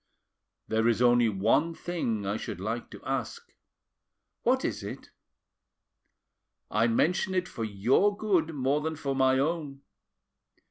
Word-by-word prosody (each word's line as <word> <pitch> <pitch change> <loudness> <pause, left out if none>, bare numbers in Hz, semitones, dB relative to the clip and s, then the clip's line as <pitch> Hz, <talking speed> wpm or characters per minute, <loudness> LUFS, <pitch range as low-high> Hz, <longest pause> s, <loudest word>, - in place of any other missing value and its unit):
"There 110 +1 +1
is 115 -1 +2
only 120 -1 +4
one 115 +12 +1
thing 120 - -3
I 100 +2 -1
should 110 - -5
like 115 +5 -4
to - - -12
ask." - - -4 0.9
"What - - +2
is - - -2
it?" - - -8 1.6
"I 115 +2 +3
mention 180 +10 +1
it 180 -1 0
for 115 - -5
your 120 - +2
good 180 -7 +1
more 140 +2 +1
than 160 +1 -2
for 140 -3 -3
my 130 0 +3
own. 145 -1 -2
130 Hz, 135 wpm, -28 LUFS, 115-160 Hz, 1.6 s, only